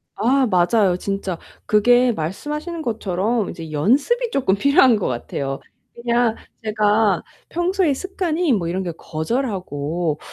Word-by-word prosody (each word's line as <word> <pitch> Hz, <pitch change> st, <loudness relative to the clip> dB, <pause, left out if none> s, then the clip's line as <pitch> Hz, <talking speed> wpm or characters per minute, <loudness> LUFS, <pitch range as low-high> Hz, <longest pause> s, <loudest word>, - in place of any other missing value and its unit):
아 260 Hz, +3 st, +2 dB
맞아요 185 Hz, 0 st, +3 dB
진짜. 195 Hz, -2 st, -3 dB, 0.3 s
그게 245 Hz, +4 st, +4 dB
말씀하시는 300 Hz, -, -4 dB
것처럼 215 Hz, -, -1 dB
이제 160 Hz, -2 st, -8 dB
연습이 280 Hz, -, +1 dB
쪼끔 250 Hz, -8 st, +2 dB
필요한 265 Hz, 0 st, +5 dB
것 205 Hz, -, -1 dB
같아요. 135 Hz, +3 st, -3 dB, 0.3 s
그냥 235 Hz, -1 st, +1 dB, 0.3 s
제가 210 Hz, -2 st, +2 dB, 0.3 s
평소에 350 Hz, -2 st, +1 dB
습관이 350 Hz, -2 st, -1 dB
뭐 175 Hz, -6 st, 0 dB
이런 185 Hz, +3 st, -2 dB
게 175 Hz, -, -3 dB
거절하고 165 Hz, -, -2 dB
215 Hz, 280 characters per minute, -21 LUFS, 180-270 Hz, 0.3 s, 필요한